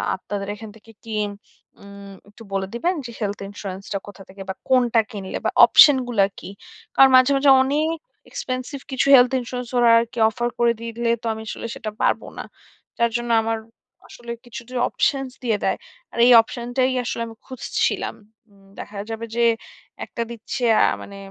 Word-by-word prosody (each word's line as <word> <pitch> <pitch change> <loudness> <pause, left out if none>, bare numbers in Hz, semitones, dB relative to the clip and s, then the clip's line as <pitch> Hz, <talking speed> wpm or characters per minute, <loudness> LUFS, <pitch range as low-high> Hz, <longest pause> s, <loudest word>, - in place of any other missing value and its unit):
আপনাদের 195 +1 -6
এখান 215 +1 -10
থেকে 225 +1 -18
কি 225 - -7 0.7
উম 200 0 -12 0.2
একটু 220 +3 -15
বলে 195 -1 -1
দিবেন, 345 +10 0
যে 235 - -7
হেলথ 205 -2 -3
ইন্সুরেন্স 195 -1 -7
টা - - 0
কোথা 205 -1 -11
থেকে 195 +1 -12
বা - - -1 0.2
কোনটা 245 -3 +4
কিনলে 195 -4 -5
বা - - +2
অপশন 290 -3 +7
গুলা 215 -5 +3
কি? - - -9 0.5
কারণ 270 0 +7
মাঝে, 255 +2 +4
মাঝে 275 0 +5
অনেক 305 +4 0 0.3
এক্সপেনসিভ 255 +2 -5
কিছু 265 +1 0
হেলথ 245 -1 +6
ইন্সুরেন্স 250 0 -6
ওরা 240 -1 +5
আরকি 235 0 -4
অফার 240 +2 -2
করে 235 -1 +4
দিলে 230 0 -3
তো - - -12
আমি 220 - -8
আসলে - - -5
সেটা 235 -5 -5
পারব - - +2 0.2
না। - - -4 0.5
যার 235 -1 +2
জন্য 240 0 -5
আমার 225 0 -1 0.5
আসলে 240 -1 -10
কিছুটা 240 +1 -10 0.2
অপশনস 270 -2 0
দিয়ে 225 -4 +1
দেয়। - - +1 0.4
আর - - -9
এই 250 - +6
অপশন 235 +1 -8
টাই 260 0 +3
আসলে 230 - -3
আমি 225 - -11
খুঁজছিলাম। 260 -2 -2 0.4
উম 195 -1 -23
দেখা 205 - -8
যাবে 225 +1 -5
যে 235 - +2 0.6
একটা 235 - -6
দিচ্ছে 235 +3 -6
অ্যা - - +5 0.2
মানে 200 - -11
235 Hz, 175 wpm, -22 LUFS, 210-255 Hz, 0.7 s, অপশন